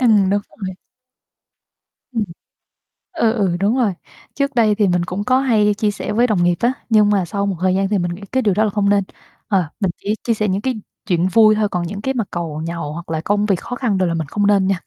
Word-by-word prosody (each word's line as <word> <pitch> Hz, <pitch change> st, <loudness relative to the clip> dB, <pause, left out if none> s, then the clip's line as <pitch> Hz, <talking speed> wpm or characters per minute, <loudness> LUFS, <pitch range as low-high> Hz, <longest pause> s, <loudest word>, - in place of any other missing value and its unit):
Ừm, 210 Hz, -6 st, +4 dB
đúng 205 Hz, +1 st, +2 dB
rồi. 190 Hz, -3 st, -7 dB, 1.4 s
Ừm. 225 Hz, -3 st, 0 dB, 0.9 s
Ừ, 225 Hz, -6 st, +3 dB
ừ, 195 Hz, -6 st, 0 dB
đúng 205 Hz, +5 st, +2 dB
rồi. 225 Hz, -7 st, +2 dB, 0.4 s
Trước 280 Hz, 0 st, -1 dB
đây 220 Hz, -3 st, +4 dB
thì 205 Hz, -1 st, +2 dB
mình 180 Hz, -1 st, +1 dB
cũng 185 Hz, +3 st, -3 dB
có 255 Hz, +3 st, +3 dB
hay 215 Hz, -6 st, +3 dB
chia 210 Hz, 0 st, 0 dB
sẻ 205 Hz, -, -4 dB
với 240 Hz, +3 st, +3 dB
đồng 200 Hz, -6 st, +1 dB
nghiệp 175 Hz, 0 st, +3 dB
á, 240 Hz, +2 st, +2 dB, 0.2 s
nhưng 215 Hz, -2 st, +5 dB
mà 200 Hz, -3 st, +2 dB
sau 200 Hz, +3 st, -2 dB
một 195 Hz, -, -1 dB
thời 185 Hz, 0 st, +2 dB
gian 195 Hz, 0 st, +1 dB
thì 210 Hz, -, +1 dB
mình 175 Hz, -2 st, -1 dB
nghĩ 190 Hz, -, -13 dB
cái 260 Hz, -, +1 dB
điều 205 Hz, -4 st, +3 dB
đó 215 Hz, -, +2 dB
là 215 Hz, -, +2 dB
không 200 Hz, 0 st, +1 dB
nên. 200 Hz, -1 st, +3 dB, 0.4 s
Ờ, 190 Hz, -4 st, +2 dB
mình 195 Hz, -5 st, +1 dB
chỉ 210 Hz, +2 st, -2 dB
chia 235 Hz, -, +1 dB
sẻ 215 Hz, -1 st, -1 dB
những 195 Hz, +1 st, 0 dB
cái 260 Hz, +2 st, -1 dB, 0.3 s
chuyện 175 Hz, -2 st, +2 dB
vui 215 Hz, +3 st, +5 dB
thôi, 215 Hz, -1 st, +1 dB
còn 175 Hz, -3 st, -2 dB
những 200 Hz, +3 st, -6 dB
cái 265 Hz, +4 st, -1 dB
mặt 230 Hz, -6 st, -2 dB
càu 160 Hz, -3 st, -4 dB
nhàu, 165 Hz, -3 st, -4 dB
hoặc 170 Hz, +1 st, -8 dB
là 160 Hz, -1 st, -2 dB
công 205 Hz, +4 st, +1 dB
việc 195 Hz, -4 st, +1 dB
khó 245 Hz, -, -6 dB
khăn 235 Hz, -6 st, 0 dB
đồ 185 Hz, -, +2 dB
là 170 Hz, -, 0 dB
mình 160 Hz, -3 st, -2 dB
không 205 Hz, +7 st, 0 dB
nên 195 Hz, -2 st, +3 dB
nha. 195 Hz, -2 st, +1 dB
205 Hz, 260 wpm, -19 LUFS, 185-220 Hz, 1.4 s, nhưng